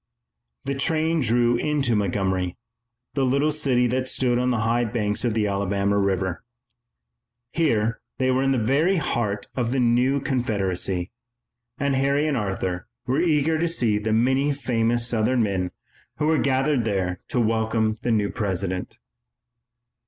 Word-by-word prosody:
The 140 - -1
train 160 +4 0
drew 120 -1 +2
into 140 -3 0
Montgomery, 95 -2 -1 0.6
the 140 - 0
little 140 +4 +2
city 130 -5 +1
that 130 +2 0
stood 125 -2 +1
on 125 0 +1
the 120 -3 0
high 115 +2 +1
banks 105 -2 -1
of 120 -3 0
the 110 -2 +1
Alabama 100 0 0
River. 95 -2 -1 1.1
Here 115 -9 0 0.2
they 130 -1 +1
were 130 +1 +1
in 135 0 +2
the 135 - +2
very 140 - +2
heart 105 - -1
of 120 -2 -1
the 135 - 0
new 125 +3 +2
Confederacy, 95 -8 -1 0.7
and 140 -1 0
Harry 140 +2 +1
and 150 - 0
Arthur 95 -4 -3 0.2
were 135 +5 +1
eager 160 -2 +2
to 170 - +1
see 120 -11 +1
the 110 +1 -2
many 130 +6 +2
famous 120 -4 0
Southern 120 +1 +2
men 95 -3 -1 0.5
who 150 - 0
were 160 0 +3
gathered 135 -1 +1
there 95 -4 -1
to 125 - -1
welcome 110 -1 0
the 125 - -2
new 105 -2 +1
President. 95 -4 -3
120 Hz, 150 wpm, -24 LUFS, 105-135 Hz, 1.1 s, were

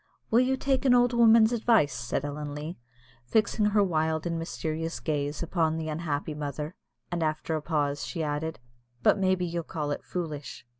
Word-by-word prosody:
"Will 230 - +6
you 260 +1 +2
take 265 -1 +1
an 255 -2 +5
old 245 0 +4
woman's 230 -1 +6
advice?" 225 - +3
said 125 +3 -2
Ellen 145 0 -5
Leah, 150 +3 -5 0.5
fixing 215 - +2
her 210 0 +4
wild 160 -3 0
and 165 -1 -1
mysterious 165 0 -3
gaze 145 0 -2
upon 165 -2 0
the 160 -1 -3
unhappy 155 -1 -2
mother; 150 +2 -4 0.4
and, 175 -1 -1
after 155 +1 -1
a 155 - -2
pause, 145 -2 -1
she 165 - -3
added, 150 +2 -2 0.5
"but - - +4
maybe 185 -1 +2
you'll 170 0 -2
call 150 -2 -4
it - - -3
foolish?" 155 -7 -5
160 Hz, 180 wpm, -28 LUFS, 150-195 Hz, 0.5 s, Will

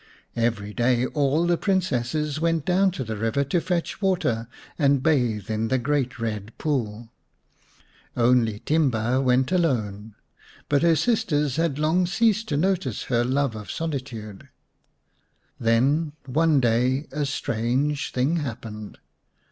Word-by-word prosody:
Every 115 -3 -1
day 120 +1 +2
all 145 +4 +1
the 175 -1 +1
Princesses 150 - 0
went 165 -2 0
down 190 +2 +3
to 135 - -4
the 110 -2 -4
river 115 +6 0
to 155 +5 0
fetch 175 +2 -2
water 165 - 0 0.3
and 140 -3 +3
bathe 120 - +1
in 110 +1 -1
the 130 - +1
great 130 0 -1
Ked 110 -2 -5
Pool. 120 -6 -2 1.1
Only 115 -3 +2
Timba 130 -8 +1
still 130 +1 +2
went 130 +3 +2
alone, 110 - -1 0.5
but 145 -1 +2
her 170 -1 +4
sisters 150 - +1
had 165 -4 0
long 160 +4 +2
ceased 220 +2 +1
to 145 - 0
notice 175 - 0
her 120 -2 +1
love 130 -1 0
of 105 -3 -8
solitude. 125 -10 -5 1.1
Then 135 +7 +2
one 150 +2 +2
day 125 +4 +1
a 150 +2 -2
strange 135 +1 -1
thing 135 +7 +1
happened. 110 -7 -6
135 Hz, 135 wpm, -24 LUFS, 115-160 Hz, 1.1 s, her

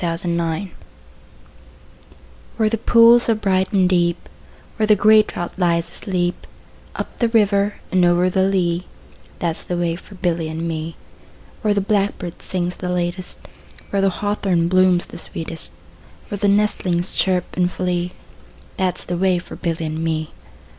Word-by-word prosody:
A - - +1
Boy's 165 0 0
Song 170 +1 -2 1.9
WHERE 220 -2 +2
the 225 - +1
pools 235 +1 +6
are 225 - +4
bright 190 -3 0
and 190 -3 +3
deep, 175 -1 +1 0.5
Where 215 -1 +1
the 210 - +6
grey 215 +2 +6
trout 175 -4 -5
lies 170 -2 +1
asleep, 180 -2 -2 0.5
Up - - -6
the 235 - +2
river 205 -2 +2 0.2
and 185 -1 +3
over 175 +1 +4
the 190 +1 +1
lea, 180 -2 +1 0.5
That 165 -2 -1
's - - -9
the 175 - -4
way 170 -1 0
for 195 +3 -13
Billy 175 -3 -1
and 160 +1 -4
me. 160 0 -4 0.7
Where 210 -2 +1
the 200 - +2
blackbird 195 -4 -1
sings 180 -1 -3
the 180 - -4
latest, 180 +1 -3 0.4
5 - - -22
Where 200 - +1
the 195 - +3
hawthorn 190 -3 0
blooms 185 -1 +3
the - - -9
sweetest, 165 0 -3 0.6
Where 205 - -4
the 205 - +2
nestlings 195 -3 +1
chirp 185 -2 +1
and 180 0 +1
flee, 180 -1 -2 0.6
That 185 -1 0
's - - -8
the 175 -1 -3
way 185 -1 +3
for 175 - -8
Billy 165 -2 -3
and 155 +1 -3
me. 160 -1 -2
180 Hz, 165 wpm, -20 LUFS, 170-200 Hz, 1.9 s, pools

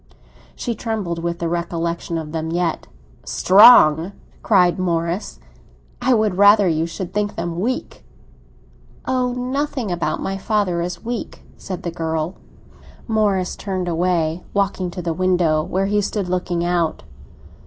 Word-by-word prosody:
She 240 - -3
trembled 215 -8 -3
with 170 0 -2
the 170 - -2
recollection 170 0 -2
of 155 -2 -6
them 160 0 -3
yet. 170 -1 -1 0.4
"Strong?" 190 -4 +6 0.3
cried 185 -5 +3
Morris. 170 - -2 0.6
"I 255 - +3
would 215 -4 0
rather 205 0 +6
you 165 -1 0
should 180 +2 -6
think 205 0 -1
them 170 0 -4
weak." 250 +7 -3 1.0
"Oh, 255 -1 0
nothing 255 -2 -2
about 175 -1 -1
my 195 0 -3
father 195 -5 0
is 175 +2 -5
weak!" 240 0 -5
said 185 -2 -7
the 170 - -3
girl. 160 0 -2 0.7
Morris 205 -5 +1
turned 185 -3 -4
away, 170 -1 0
walking 195 -2 0
to 175 0 -7
the 165 -1 -1
window, 175 -3 +2
where 190 +4 -1
he 205 +1 +1
stood 200 -1 -2
looking 180 -1 -1
out. 175 - 0
180 Hz, 140 wpm, -20 LUFS, 170-205 Hz, 1.0 s, Strong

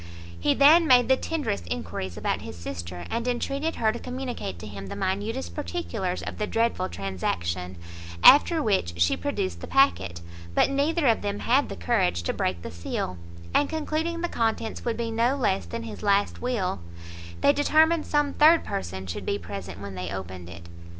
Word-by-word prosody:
He 115 - +2
then 315 +4 +7
made 245 -2 +5
the 265 - +6
tenderest 260 - -3
enquiries 85 +2 -4
about - - -1
his - - -8
sister, 85 0 -6
and 235 +1 -2
entreated 275 +6 -1
her 220 -1 +2
to 235 - -6
communicate 250 - -5
to 85 - -9
him 100 -2 -8
the - - -6
minutest 205 +7 -2
particulars 230 - -3
of - - -6
the 210 - -1
dreadful 230 - 0
transaction; 90 -1 -3 0.5
after 305 +3 +7
which, 85 - 0
she 85 - +4
produced 85 -2 -3
the - - -6
packet, 180 - +2 0.3
but - - +4
neither 295 +3 +1
of 230 -3 +3
them 205 0 -3
had 270 +4 +2
the - - -5
courage 85 0 +1
to - - -1
break 90 -2 -2
the - - -6
seal; 85 +1 -4 0.4
and 290 - +3
concluding 320 +2 -2
the 345 - 0
contents 225 -5 -2
would 235 -2 -1
be 230 -1 -2
no 235 +4 +2
less 200 -8 0
than 230 0 -5
his 225 -2 -8
last 200 -1 +1
will, 225 - -1 0.6
they 285 - +5
determined 310 +3 +3
some 295 -1 +1
third 320 +3 +6
person 95 +1 -4
should 90 +1 -5
be 100 - -1
present 95 0 -7
when 100 -1 -7
they 90 -1 -5
opened 95 -2 -6
it. 85 0 -10
210 Hz, 185 wpm, -26 LUFS, -, 0.6 s, then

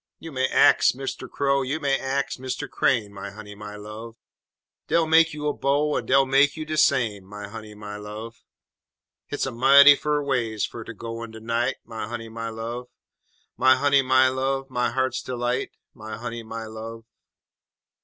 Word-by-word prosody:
You 165 - -9
may 130 -1 +1
ax - - +5
Mister 135 +1 -5
Crow, 140 -1 +1
you 135 +4 -2
may 140 -2 +1
ax 135 +1 -2
Mr. 130 -1 -4
Crane, 105 -5 0
My 100 0 -7
honey, 105 0 -10
my 105 0 -9
love! 105 +2 -9 0.7
Dey'll 170 -1 +3
make 160 +1 +5
you 150 0 -6
a 145 - +1
bow, 145 +2 +1
en - - -2
dey'll 135 +1 +5
tell 135 +1 +4
you 155 -1 -6
de 155 0 -3
same, 115 -10 +2
My 105 +2 -9
honey, 110 0 -10
my 105 0 -8
love! 105 +2 -9 0.8
Hit's 145 - -2
a 135 - -3
mighty 140 +4 +8
fur 150 0 -1
ways 120 -6 0
fer 115 - -8
ter 115 - -8
go 115 +2 -7
in 115 - -6
de 110 0 -10
night, 115 +2 -1
My 110 -2 -6
honey, 115 0 -6
my 115 0 -5
love! 115 +2 -6 0.7
_My 130 +1 +6
honey, 140 0 +4
my 130 0 +4
love, 135 +1 -2
my 125 -1 0
heart's 130 +2 -1
delight 125 0 -2 0.2
My 110 0 -8
honey, 120 0 -5
my 115 0 -7
love! 110 +1 -8
120 Hz, 185 wpm, -24 LUFS, 110-135 Hz, 0.8 s, mighty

